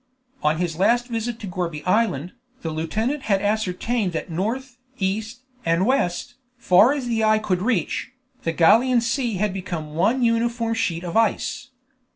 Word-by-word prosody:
On 155 +1 +2
his 170 -1 -2
last 240 +5 +3
visit 230 0 -3
to 205 - -5
Gourbi 175 -4 -4
Island, 185 -6 +1 0.3
the 165 - -2
lieutenant 215 - -2
had 195 -1 +4
ascertained 205 0 -1
that 165 +2 -4
north, 240 +9 -3 0.2
east, 220 +5 -3 0.2
and 165 +3 +2
west, 245 -4 0 0.2
far 215 +1 +5
as 285 -3 -2
the 230 -2 0
eye 215 0 +4
could 190 -4 -1
reach, 210 -1 -1 0.3
the 165 - -1
Gallian 230 +10 +4
Sea 235 -1 0
had 205 +1 0
become 170 -5 -5
one 220 +11 +2
uniform 230 0 +1
sheet 175 -7 -1
of 175 -2 -5
ice. 225 +4 0
215 Hz, 160 wpm, -23 LUFS, 180-235 Hz, 0.3 s, far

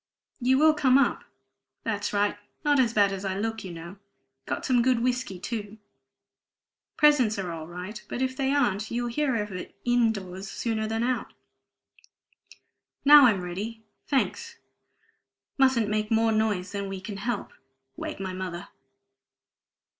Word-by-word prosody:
You 260 +1 +3
will 310 +2 +6
come 270 -4 +4
up? 275 -3 +1 0.6
That's 205 -2 -2
right! 205 0 +1 0.3
Not 290 -1 +4
as 240 -3 +3
bad 205 -3 +3
as 195 0 -5
I 190 -1 -2
look, 225 +2 -3
you 185 - -7
know. 170 +3 -9 0.5
Got - - -3
some 250 -2 +3
good 245 -1 +2
whiskey, 250 -6 -1
too. 215 +1 -5 1.2
Presents 265 -8 +4
are 185 -3 -3
all 160 -1 -6
right; 180 +5 -7
but - - -4
if 260 0 -1
they 270 0 0
aren't 215 -7 +1
you'll 240 0 -2
hear 275 +1 0
of 210 -2 -2
it 185 -1 -7
in 240 -2 +3
doors 190 -1 -7
sooner 220 -1 -2
than 225 +1 -1
out. 250 -1 -2 1.7
Now 290 -2 +10
I'm 205 -5 +2
ready 210 +6 -5 0.2
thanks! 275 -2 -1 1.0
Mustn't 260 -5 +4
make 215 0 -1
more 225 0 +3
noise 210 -4 0
than 200 -1 -4
we 195 -1 -5
can 195 +1 -7
help 235 +5 -3 0.4
wake - - -6
my 190 -1 -4
mother." 185 0 -6
220 Hz, 155 wpm, -27 LUFS, 195-250 Hz, 1.7 s, Now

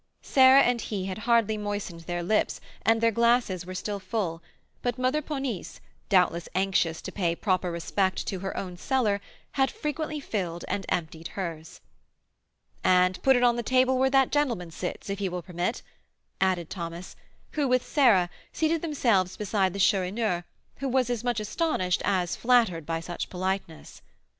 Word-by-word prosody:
Sarah 265 0 +7
and 245 -1 +1
he 200 -4 -3
had 190 +1 -4
hardly 220 -2 +3
moistened 205 -4 -4
their 175 +1 -4
lips, 210 +5 +1 0.2
and 225 0 +3
their 230 0 +4
glasses 235 -6 +2
were 185 - -6
still 205 +2 -3
full; 185 -4 -3 0.4
but 245 0 -1
Mother 255 +4 +1
Ponisse, 270 - -4 0.3
doubtless 180 -4 +2
anxious 185 -4 +1
to - - -5
pay 170 -4 0
proper 185 -2 0
respect 190 +3 -1
to 190 - -3
her 195 +1 -4
own 180 -2 -5
cellar, 215 -3 +1 0.3
had 270 -1 +2
frequently 305 0 -3
filled 180 -10 -3
and 195 - -3
emptied 165 -1 -2
hers. 165 -4 -5 1.0
"And 180 0 +3
put 265 0 +5
it 245 - +2
on 240 -1 +4
the - - 0
table 255 +2 +3
where 265 0 +4
that 270 -1 +3
gentleman 235 - 0
sits, 180 +2 -5
if 200 0 -3
he 195 -2 -1
will 180 -1 -5
permit," 180 +7 -3 0.6
added 185 -4 +1
Thomas, 170 0 -6 0.4
who, 295 -3 0
with 255 0 +2
Sarah, 230 - +4 0.2
seated 320 0 0
themselves 230 - +1
beside 200 -2 +1
the 200 - -6
Chourineur, 190 -1 +1 0.3
who 275 - -2
was 255 -1 +1
as 240 -2 -2
much 245 -2 0
astonished 210 - 0
as 185 -3 0
flattered 225 -10 +2
by 165 0 -2
such 175 +1 -5
politeness. 185 -3 -4
200 Hz, 165 wpm, -27 LUFS, 180-245 Hz, 1.0 s, Sarah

